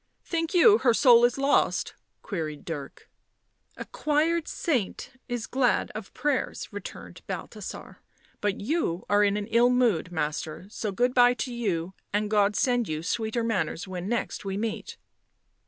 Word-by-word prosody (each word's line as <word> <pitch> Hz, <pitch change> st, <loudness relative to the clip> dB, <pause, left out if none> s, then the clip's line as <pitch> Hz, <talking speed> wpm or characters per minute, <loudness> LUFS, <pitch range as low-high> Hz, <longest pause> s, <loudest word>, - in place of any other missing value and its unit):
" -, -, -48 dB
Think 330 Hz, +2 st, 0 dB
you 420 Hz, +5 st, +7 dB
her 240 Hz, -3 st, +3 dB
soul 240 Hz, -3 st, +7 dB
is 245 Hz, -, +1 dB
lost?" 275 Hz, +1 st, +2 dB, 0.3 s
queried 155 Hz, -7 st, -4 dB
Dirk. 145 Hz, -5 st, -7 dB, 0.7 s
11 -, -, -5 dB
A -, -, -20 dB
choired 310 Hz, +2 st, +1 dB
saint 250 Hz, -, -2 dB, 0.2 s
is 245 Hz, -3 st, -2 dB
glad 255 Hz, -2 st, +1 dB
of 215 Hz, -2 st, -7 dB
prayers," 295 Hz, -3 st, -1 dB
returned -, -, -8 dB
Balthasar. -, -, -7 dB, 0.2 s
" -, -, -34 dB
But 205 Hz, -1 st, 0 dB
you 210 Hz, -, -1 dB
are 205 Hz, 0 st, +5 dB
in 205 Hz, 0 st, +2 dB
an 205 Hz, -, -3 dB
ill 235 Hz, +3 st, +4 dB
mood, 235 Hz, -9 st, +2 dB
master, 155 Hz, +1 st, -3 dB
so 215 Hz, -1 st, -4 dB
good 245 Hz, +5 st, +1 dB
bye 245 Hz, -1 st, +5 dB
to 250 Hz, 0 st, -4 dB
you 190 Hz, -7 st, -2 dB, 0.2 s
and 210 Hz, +1 st, -1 dB
God 205 Hz, -1 st, +3 dB
send 245 Hz, -2 st, +1 dB
you 155 Hz, 0 st, -3 dB
sweeter 220 Hz, +5 st, -1 dB
manners 190 Hz, -6 st, -1 dB
when 185 Hz, +1 st, -5 dB
next 235 Hz, 0 st, -2 dB
we 195 Hz, -1 st, -3 dB
meet." 220 Hz, +1 st, -4 dB
225 Hz, 165 wpm, -27 LUFS, 190-250 Hz, 0.7 s, you